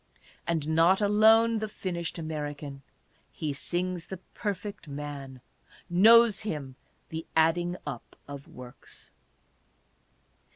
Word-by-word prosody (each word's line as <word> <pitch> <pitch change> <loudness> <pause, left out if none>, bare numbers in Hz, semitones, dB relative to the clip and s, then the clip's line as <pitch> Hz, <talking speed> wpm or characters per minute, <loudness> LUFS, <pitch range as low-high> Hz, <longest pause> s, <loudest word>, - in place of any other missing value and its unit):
And 160 -3 -1
not 165 +4 +4
alone 220 +2 +5
the 215 - -2
finished 175 -5 -4
American: 145 -3 -5 0.5
he 150 -3 -3
sings 175 +4 -3
the 190 - -6 0.2
Per 205 -3 -2
fect 200 -2 -9
Man; 140 -2 -7 0.5
knows 225 +3 +6
him 145 -10 -5 0.2
" - - -41
the 160 0 -6
adding 175 +2 +2
up 135 -5 -7
of 140 -1 -9
works." 125 0 -12
165 Hz, 115 wpm, -28 LUFS, 145-200 Hz, 0.5 s, knows